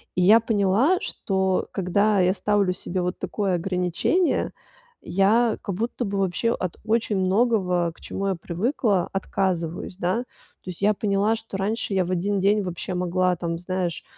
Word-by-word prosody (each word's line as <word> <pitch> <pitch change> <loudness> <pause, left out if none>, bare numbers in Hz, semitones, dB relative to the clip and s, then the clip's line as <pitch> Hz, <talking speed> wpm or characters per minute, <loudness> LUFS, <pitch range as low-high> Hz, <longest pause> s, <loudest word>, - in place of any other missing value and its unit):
И 180 - +1
я 215 +6 +7
поняла, 225 - +2
что 190 -1 -1
когда 200 +2 +2
я 185 0 +3
ставлю 200 -2 +1
себе 180 0 -3
вот 180 +1 -2
такое 195 -3 -1
ограничение, 180 - 0 0.6
я 215 +5 +3
как 195 - -4
будто 230 +4 -2
бы 200 -2 -2
вообще 195 +5 0
от 185 -2 -4
очень 220 -1 0
многого, 185 -3 +2
к - - -23
чему 195 - -4
я 195 - +1
привыкла, 190 - 0
отказываюсь, 185 -2 -2
да. 185 +5 0 0.4
То - - -9
есть 175 - -10
я 210 +1 +4
поняла, 205 +2 +1
что 220 -3 -7
раньше 210 +1 -2
я 185 -1 +2
в 175 - -6
один 195 +3 0
день 205 +2 +3
вообще 180 0 -4
могла 180 0 +1
там, 170 -1 -3
знаешь, 180 -2 -3
195 Hz, 165 wpm, -24 LUFS, 180-210 Hz, 0.6 s, я